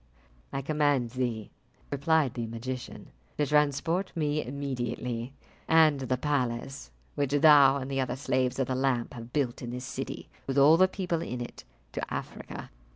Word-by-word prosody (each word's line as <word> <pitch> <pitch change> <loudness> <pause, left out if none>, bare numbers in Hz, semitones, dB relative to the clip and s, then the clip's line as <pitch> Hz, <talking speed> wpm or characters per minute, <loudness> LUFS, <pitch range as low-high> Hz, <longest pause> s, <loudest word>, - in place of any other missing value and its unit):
"I 135 0 -3
command 145 -5 +1
thee," 120 -4 -3 0.4
replied 145 -1 +2
the 120 -2 -3
magician, 120 +3 -6 0.3
"to 150 - +2
transport 150 +6 +1
me 150 -2 0
immediately, 125 -2 -3 0.4
and 160 -3 +5
the 130 -1 -1
palace 130 - -2 0.2
which 140 -1 -1
thou 145 -2 +7
and 135 0 -5
the 135 0 +1
other 125 -1 -2
slaves 130 -1 0
of 135 - +1
the 130 - -2
lamp 130 -2 0
have 115 0 -9
built 130 -4 -1
in 120 - -5
this 125 +1 -5
city, - - -5 0.2
with 135 0 -1
all 145 +3 +8
the 185 +2 +5
people 180 -3 -2
in 125 -5 -4
it, 120 - -8 0.3
to - - -5
Africa." - - -6
135 Hz, 160 wpm, -29 LUFS, 125-150 Hz, 0.4 s, all